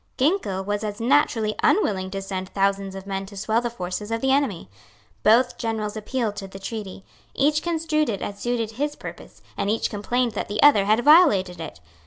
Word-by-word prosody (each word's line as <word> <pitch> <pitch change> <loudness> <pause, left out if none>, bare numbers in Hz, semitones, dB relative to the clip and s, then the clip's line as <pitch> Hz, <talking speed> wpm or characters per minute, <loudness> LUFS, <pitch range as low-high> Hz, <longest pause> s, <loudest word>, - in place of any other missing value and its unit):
Ginkell 260 - +1
was 205 +1 -2
as 210 -1 -4
naturally 230 -4 +2
unwilling 190 - +2
to 195 0 -5
send 190 -1 -5
thousands 195 -1 0
of 195 0 -8
men 195 -1 -4
to 200 0 -11
swell 220 +3 +1
the 240 - -2
forces 205 -1 -5
of 225 0 -1
the 265 +2 +1
enemy. 270 -11 0 0.5
Both 235 +4 +3
generals 220 -2 -2
appealed 220 0 -2
to 195 -2 -5
the 190 - -10
treaty. 195 -1 -7 0.3
Each 295 +2 +2
construed 320 -3 0
it 200 -4 -3
as 200 0 -6
suited 235 -2 -2
his 290 +6 -3
purpose, - - -11
and 200 - -1
each 220 +2 0
complained 240 +4 0
that 210 - -4
the 205 +1 -1
other 250 -9 +6
had 215 +3 +2
violated 205 - +5
it. 160 - -8
215 Hz, 195 wpm, -24 LUFS, 195-255 Hz, 0.5 s, other